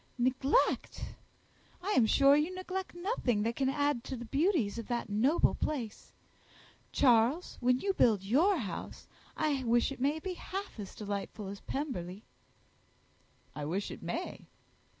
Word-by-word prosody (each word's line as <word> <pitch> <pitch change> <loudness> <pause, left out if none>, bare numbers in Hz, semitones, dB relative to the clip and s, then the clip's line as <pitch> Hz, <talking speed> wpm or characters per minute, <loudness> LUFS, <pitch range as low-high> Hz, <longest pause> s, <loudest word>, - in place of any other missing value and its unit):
"Neglect! 260 - +1 0.7
I 400 - -1
am 240 - +4
sure 275 +4 +6
you 300 +4 +1
neglect 370 0 -4
nothing 345 - 0
that 230 +1 -1
can 265 -1 +1
add 285 -3 0
to 260 - -4
the 240 - -7
beauties 275 - +1
of 230 - -6
that 240 -2 -2
noble 255 +11 +3
place. 245 -9 -4 0.8
Charles, 250 +6 +3
when 250 0 +3
you 390 +8 0
build 215 - +3
your 315 - +3
house, 195 - -6 0.3
I 295 -4 +1
wish 240 +2 +2
it 270 - -7
may 285 +4 +2
be 365 +4 -4
half 385 - -6
as 200 - -7
delightful 205 0 -5
as 200 0 -7
Pemberley." 215 - -4 1.3
"I 150 - -4
wish 185 +7 -2
it - - -8
may." - - -5
260 Hz, 150 wpm, -32 LUFS, 220-310 Hz, 1.3 s, sure